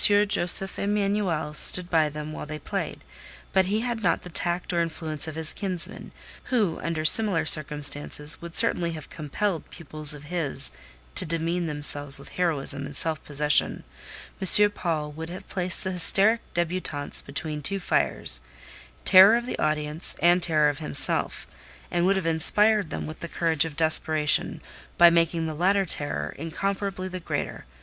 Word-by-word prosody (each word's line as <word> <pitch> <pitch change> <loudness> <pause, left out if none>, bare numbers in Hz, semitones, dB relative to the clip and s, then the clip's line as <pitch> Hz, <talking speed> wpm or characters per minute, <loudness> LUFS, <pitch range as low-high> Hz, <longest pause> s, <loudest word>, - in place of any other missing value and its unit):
Josef 200 -2 +1
Emanuel 200 -6 -2
stood 180 +3 +2
by 160 -3 +1
them 150 +1 -8
while 150 - -8
they 155 0 -7
played; - - -6 0.5
but 190 -1 +2
he 210 +4 -2
had 240 -2 -4
not 175 -5 -1
the 180 - -11
tact 175 +1 -3
or 170 - 0
influence 160 -2 -3
of 155 - -7
his 160 -1 -1
kinsman, 185 -4 -5 0.3
who, 210 -10 -1
under 165 -2 -4
similar 185 -3 +2
circumstances, 150 0 +3
would 170 -1 -7
certainly 170 -1 +1
have 155 -3 -11
compelled 165 +3 -4
pupils 155 -2 0
of 145 - -13
his 145 -4 -2 0.4
to - - +9
demean 165 +2 -2
themselves 145 -2 +2
with 140 - -11
heroism 145 -5 -3
and 140 - -8
self 160 0 -1
possession. 150 0 +1 0.6
M. 205 +2 +4
Paul 160 -6 -4
would 160 +2 -9
have 180 +2 -10
placed 180 -1 0
the 190 - -4
hysteric 200 +5 +6
débutantes 170 -4 -2
between 150 +1 -5
two 195 +7 -3
fires—terror 60 - +1
of 240 - -5
the - - -6
audience, 155 +1 -1
and 175 +1 +3
terror 155 -3 +3
of 145 0 -6
himself—and 170 +3 0
would 195 - +2
have 190 -3 -3
inspired 205 +4 +2
them - - -6
with 155 +1 -9
the 170 - -7
courage 165 -2 0
of 155 -3 -9
desperation, 155 -1 +1 0.4
by 175 0 +6
making 165 0 0
the 160 - -5
latter 190 +5 0
terror 110 - -3
incomparably 190 +3 -4
the 185 0 -7
greater: 170 - -6
M. 60 -2 -28
165 Hz, 160 wpm, -24 LUFS, 150-185 Hz, 0.6 s, to